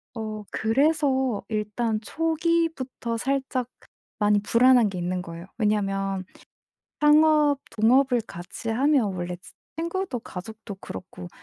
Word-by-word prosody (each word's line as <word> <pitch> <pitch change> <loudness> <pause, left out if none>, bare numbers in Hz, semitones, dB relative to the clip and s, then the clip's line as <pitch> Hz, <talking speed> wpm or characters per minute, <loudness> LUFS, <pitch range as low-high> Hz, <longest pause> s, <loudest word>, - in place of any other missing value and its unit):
어 215 -2 -5
그래서 265 -1 +1
일단 215 +1 -1
초기부터 320 -5 -1
살짝 265 0 -1
그 - - -22 0.3
많이 210 -1 +4
불안한 235 +2 +5
게 190 - -6
있는 180 +1 -2
거예요. 170 -1 -8
왜냐면 195 -3 0 0.8
창업 300 -1 +5
동업을 245 +2 +3
같이 175 +6 -6
하면 250 -4 +2
원래 175 0 -4 0.4
친구도 335 -4 -2
가족도 215 +2 -8
그렇고 90 -1 -8
230 Hz, 245 characters per minute, -25 LUFS, 205-275 Hz, 0.8 s, 불안한